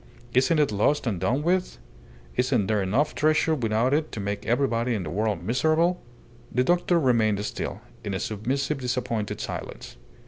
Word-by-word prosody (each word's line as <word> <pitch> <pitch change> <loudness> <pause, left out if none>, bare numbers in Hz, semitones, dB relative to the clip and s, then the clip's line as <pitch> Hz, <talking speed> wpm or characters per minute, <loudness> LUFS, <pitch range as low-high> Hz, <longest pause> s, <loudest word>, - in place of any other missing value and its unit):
"Isn't 130 +6 +3
it 150 -6 +3
lost 105 +9 +1
and 105 -7 -1
done 130 +10 0
with? 180 +2 0 0.6
Isn't 125 -5 +2
there 105 0 +1
enough 125 +11 +1
treasure 155 +1 +2
without 120 -1 +1
it 155 +1 0
to - - -4
make 100 +1 -3
everybody 120 -1 +1
in 100 - -2
the 75 - -5
world 105 +3 -1
miserable?" 155 +8 +2 0.5
The 125 - +2
doctor 175 +3 +2
remained 110 -7 +2
still, - - -4 0.2
in 100 - -3
a - - -2
submissive, 135 +9 -2
disappointed 120 -4 -2
silence. - - -6
125 Hz, 165 wpm, -26 LUFS, 110-150 Hz, 0.6 s, Isn't